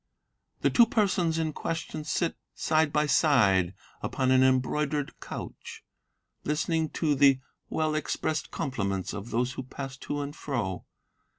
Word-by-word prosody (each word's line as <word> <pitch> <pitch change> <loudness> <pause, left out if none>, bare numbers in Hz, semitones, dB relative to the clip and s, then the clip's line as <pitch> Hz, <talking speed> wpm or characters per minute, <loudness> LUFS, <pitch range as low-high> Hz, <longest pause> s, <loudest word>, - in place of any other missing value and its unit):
"The - - +3
two 235 -1 +6
persons 185 -7 +1
in 160 -1 -1
question 160 -1 -4
sit, 165 +2 0 0.2
side 155 -2 +2
by 150 0 +2
side, 100 - +4 0.3
upon 130 -1 0
an 130 0 +6
embroidered 140 +3 +1
couch, - - -8 0.6
Listening 160 +1 0
to 155 -3 +1
the 135 -1 +5 0.3
well 155 -1 0
expressed 155 0 -1
compliments 100 -8 -2
of 105 +3 -6
those 125 +2 0
who - - -4
pass 135 +1 -7
to 145 +1 -3
and 140 +1 -6
fro. 105 -10 -3
145 Hz, 135 wpm, -28 LUFS, 130-155 Hz, 0.6 s, two